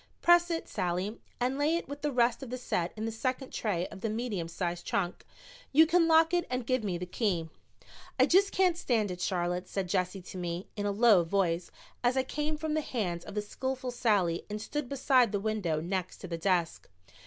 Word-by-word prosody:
"Press 345 Hz, 0 st, +6 dB
it, 330 Hz, -1 st, -2 dB
Sallie, 185 Hz, +3 st, -2 dB, 0.2 s
and 255 Hz, +3 st, 0 dB
lay 305 Hz, +3 st, +3 dB
it 340 Hz, -, -3 dB
with 285 Hz, +1 st, -7 dB
the 295 Hz, 0 st, 0 dB
rest 240 Hz, -1 st, +2 dB
of 265 Hz, -, -7 dB
the 255 Hz, -, -3 dB
set 180 Hz, -8 st, -1 dB
in 215 Hz, -, -3 dB
the 225 Hz, -, -2 dB
second 255 Hz, +4 st, -3 dB
tray 185 Hz, -6 st, -1 dB
of 190 Hz, -, -11 dB
the 225 Hz, -, -1 dB
medium 215 Hz, -6 st, -2 dB
sized 175 Hz, 0 st, -3 dB
trunk. 180 Hz, -2 st, -2 dB, 0.5 s
You 315 Hz, +3 st, +7 dB
can 335 Hz, +1 st, +3 dB
lock 325 Hz, +1 st, +5 dB
it 350 Hz, -1 st, +1 dB
and 250 Hz, -1 st, -2 dB
give 255 Hz, -1 st, +1 dB
me 185 Hz, -4 st, -1 dB
the 180 Hz, -, -4 dB
key." 180 Hz, -4 st, -1 dB, 0.7 s
"I 260 Hz, -, +7 dB
just 390 Hz, +6 st, +4 dB
can't 370 Hz, -3 st, +3 dB
stand 220 Hz, -, +1 dB
it, 180 Hz, 0 st, -6 dB
Charlotte," 180 Hz, 0 st, -1 dB
said 195 Hz, -2 st, -2 dB
Jessie 185 Hz, 0 st, -1 dB
to 185 Hz, -, -8 dB
me 175 Hz, +1 st, -3 dB
in 205 Hz, 0 st, -2 dB
a -, -, +1 dB
low 205 Hz, -3 st, +5 dB
voice, 170 Hz, -1 st, 0 dB, 0.3 s
as 245 Hz, +2 st, +2 dB
I 260 Hz, -, +3 dB
came 300 Hz, +3 st, -2 dB
from 310 Hz, 0 st, -2 dB
the 310 Hz, -, +1 dB
hands 180 Hz, -, -3 dB
of -, -, -9 dB
the 210 Hz, -, -1 dB
skillful 260 Hz, +4 st, -3 dB
Sallie 200 Hz, -8 st, +1 dB
and 210 Hz, +1 st, -4 dB
stood 260 Hz, +4 st, -4 dB
beside 260 Hz, -4 st, +3 dB
the 205 Hz, -, 0 dB
window 200 Hz, -7 st, -1 dB
next 185 Hz, +2 st, -3 dB
to -, -, -6 dB
the 170 Hz, -, -3 dB
desk. 175 Hz, -2 st, 0 dB
215 Hz, 220 wpm, -30 LUFS, 180-265 Hz, 0.7 s, You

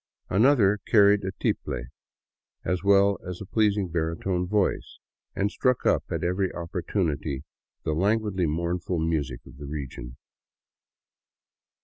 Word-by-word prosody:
Another 105 Hz, -2 st, +4 dB
carried 100 Hz, -2 st, +5 dB
a 95 Hz, -, -2 dB
tiple, -, -, -1 dB, 0.8 s
as 90 Hz, 0 st, -1 dB
well 100 Hz, 0 st, +4 dB
as 90 Hz, -1 st, -6 dB
a 100 Hz, -, -7 dB
pleasing 105 Hz, -1 st, +1 dB
baritone 85 Hz, +2 st, -1 dB
voice, 105 Hz, 0 st, 0 dB, 0.4 s
and 100 Hz, +1 st, 0 dB
struck 125 Hz, -2 st, +1 dB
up -, -, +3 dB
at -, -, -2 dB
every 90 Hz, +2 st, +1 dB
oppor 85 Hz, +1 st, -5 dB
tunity 80 Hz, -6 st, -1 dB, 0.4 s
the 80 Hz, -, -1 dB
languidly 100 Hz, 0 st, +1 dB
mournful 85 Hz, +3 st, -1 dB
music 75 Hz, -6 st, -1 dB
of -, -, -14 dB
the 70 Hz, -, -7 dB
region. 65 Hz, -4 st, -6 dB
90 Hz, 125 wpm, -26 LUFS, 80-100 Hz, 0.8 s, carried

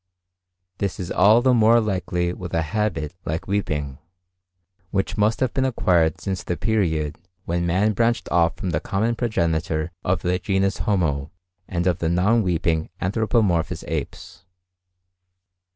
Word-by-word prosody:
This 100 Hz, -2 st, -2 dB
is 90 Hz, -, -5 dB
all 105 Hz, +6 st, +5 dB
the 130 Hz, -1 st, +4 dB
more 115 Hz, 0 st, +5 dB
likely 90 Hz, -4 st, -1 dB
with 90 Hz, -2 st, -6 dB
a 80 Hz, -, +1 dB
habit 80 Hz, -3 st, -2 dB
like 80 Hz, +2 st, -3 dB
weeping, 75 Hz, -9 st, -2 dB, 0.9 s
which 95 Hz, -1 st, -1 dB
must 110 Hz, +2 st, +1 dB
have 130 Hz, -3 st, +1 dB
been 135 Hz, -, +1 dB
acquired 90 Hz, -, +2 dB
since 95 Hz, -2 st, -3 dB
the 90 Hz, -, -3 dB
period 80 Hz, -9 st, 0 dB, 0.3 s
when 85 Hz, +1 st, -1 dB
man 100 Hz, +5 st, +2 dB
branched 115 Hz, +2 st, +1 dB
off 85 Hz, -1 st, +3 dB
from 90 Hz, -, -3 dB
the -, -, 0 dB
common 110 Hz, +4 st, -1 dB
progenitor 85 Hz, -8 st, -1 dB
of 90 Hz, +1 st, 0 dB
the 90 Hz, 0 st, +1 dB
genus 95 Hz, +1 st, 0 dB
Homo 75 Hz, -8 st, 0 dB, 0.4 s
and 85 Hz, -1 st, -2 dB
of 90 Hz, -3 st, +1 dB
the 80 Hz, -, 0 dB
non 100 Hz, +7 st, +3 dB
weeping 85 Hz, -4 st, 0 dB
anthropomorphous 100 Hz, -4 st, 0 dB
apes. 90 Hz, -, -5 dB
90 Hz, 145 wpm, -23 LUFS, 85-105 Hz, 0.9 s, all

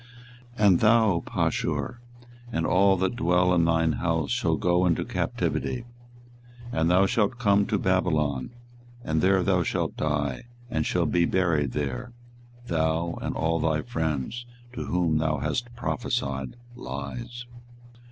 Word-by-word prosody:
24:020:006 105 Hz, -, +4 dB
And 90 Hz, -3 st, +5 dB
thou, 110 Hz, -6 st, +4 dB
Pashur, 120 Hz, -, -1 dB, 0.5 s
and 80 Hz, -7 st, -1 dB
all 95 Hz, +2 st, +4 dB
that 95 Hz, +5 st, 0 dB
dwell 90 Hz, -2 st, +2 dB
in 85 Hz, -2 st, +3 dB
thine 80 Hz, -1 st, +2 dB
house 80 Hz, -5 st, -1 dB
shall -, -, +1 dB
go 90 Hz, +1 st, +2 dB
into 85 Hz, -, +1 dB
captivity: 120 Hz, -2 st, -2 dB, 0.9 s
and 80 Hz, -3 st, +1 dB
thou 95 Hz, +2 st, +5 dB
shalt 105 Hz, +3 st, +1 dB
come 100 Hz, -4 st, +3 dB
to 105 Hz, -, +1 dB
Babylon, 80 Hz, -8 st, 0 dB, 0.5 s
and 80 Hz, 0 st, 0 dB
there 95 Hz, -1 st, +3 dB
thou 95 Hz, -1 st, +2 dB
shalt -, -, -1 dB
die, 75 Hz, -, -2 dB, 0.3 s
and -, -, 0 dB
shalt 85 Hz, -4 st, 0 dB
be 85 Hz, -1 st, +3 dB
buried 80 Hz, -8 st, +1 dB
there, 70 Hz, -, -3 dB, 0.5 s
thou, 80 Hz, -1 st, -1 dB
and -, -, -3 dB
all 80 Hz, +1 st, 0 dB
thy 80 Hz, -1 st, 0 dB
friends, 80 Hz, -, -3 dB, 0.3 s
to 125 Hz, -, -5 dB
whom 85 Hz, -3 st, +1 dB
thou 80 Hz, -1 st, 0 dB
hast 120 Hz, -, -2 dB
prophesied 70 Hz, -, -2 dB, 0.2 s
lies. 70 Hz, -, -6 dB
85 Hz, 140 wpm, -26 LUFS, 75-95 Hz, 0.9 s, And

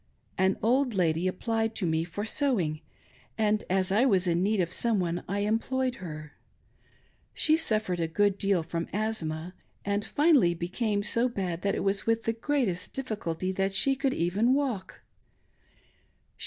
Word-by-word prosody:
An 190 Hz, 0 st, +2 dB
old 250 Hz, +1 st, +2 dB
lady 170 Hz, -1 st, +1 dB
applied 225 Hz, +4 st, -1 dB
to 190 Hz, -, -1 dB
me 160 Hz, -1 st, +1 dB
for 180 Hz, +5 st, -5 dB
sew 270 Hz, 0 st, +1 dB
ing, 155 Hz, -2 st, -2 dB, 0.6 s
and, 215 Hz, -1 st, +1 dB
as 190 Hz, 0 st, +2 dB
I 215 Hz, +5 st, +4 dB
was 195 Hz, -8 st, +3 dB
in 175 Hz, -1 st, +1 dB
need 205 Hz, +2 st, +1 dB
of 175 Hz, 0 st, 0 dB
some 230 Hz, -4 st, +1 dB
one, 175 Hz, -1 st, -2 dB
I 200 Hz, +1 st, -1 dB
employed 250 Hz, +5 st, 0 dB
her. 155 Hz, -3 st, -8 dB, 1.0 s
She 310 Hz, -, +4 dB
suffered 215 Hz, -, 0 dB
a 165 Hz, -, 0 dB
good 200 Hz, +4 st, +1 dB
deal 195 Hz, -4 st, +2 dB
from 165 Hz, +1 st, -4 dB
asthma, 180 Hz, -6 st, -2 dB, 0.3 s
and 205 Hz, +1 st, 0 dB
finally 285 Hz, -, +3 dB
became 205 Hz, +5 st, -1 dB
s.. 210 Hz, -, -1 dB, 0.2 s
bad 180 Hz, -3 st, -2 dB
that 200 Hz, -, 0 dB
it -, -, -2 dB
was 200 Hz, +2 st, 0 dB
with 225 Hz, 0 st, +1 dB
the 225 Hz, -, 0 dB
greatest 230 Hz, -7 st, -1 dB
difficulty 190 Hz, -9 st, -3 dB
that 195 Hz, +1 st, -1 dB
she 270 Hz, +7 st, +4 dB
could 270 Hz, 0 st, 0 dB
even 205 Hz, +9 st, +2 dB
walk. 245 Hz, -10 st, -3 dB
200 Hz, 165 wpm, -28 LUFS, 175-225 Hz, 1.0 s, I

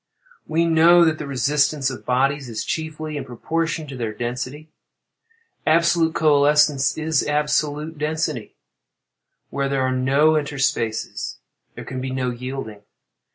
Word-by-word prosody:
We 165 Hz, +2 st, +1 dB
know 170 Hz, +1 st, +6 dB
that 160 Hz, -1 st, +1 dB
the 150 Hz, -, -5 dB
resistance 140 Hz, +1 st, +1 dB
of 130 Hz, -, -10 dB
bodies 135 Hz, +1 st, +1 dB
is, 110 Hz, -1 st, -4 dB
chiefly, 155 Hz, -1 st, -4 dB
in -, -, -4 dB
proportion 160 Hz, +6 st, -3 dB
to 140 Hz, -2 st, -8 dB
their 115 Hz, -3 st, -3 dB
density. 130 Hz, +6 st, -5 dB, 1.0 s
Absolute 165 Hz, 0 st, +3 dB
coalescence 150 Hz, -2 st, +3 dB
is 160 Hz, -2 st, 0 dB
absolute 150 Hz, +1 st, -1 dB
density. 155 Hz, -5 st, -2 dB, 1.0 s
Where 140 Hz, 0 st, -1 dB
there 135 Hz, -1 st, 0 dB
are 130 Hz, -, +1 dB
no 135 Hz, +4 st, +3 dB
interspaces, 140 Hz, -7 st, -1 dB, 0.4 s
there -, -, -8 dB
can 130 Hz, 0 st, -5 dB
be 130 Hz, -, -3 dB
no 130 Hz, -1 st, -1 dB
yielding. 125 Hz, -4 st, -6 dB
145 Hz, 130 wpm, -22 LUFS, 130-155 Hz, 1.0 s, know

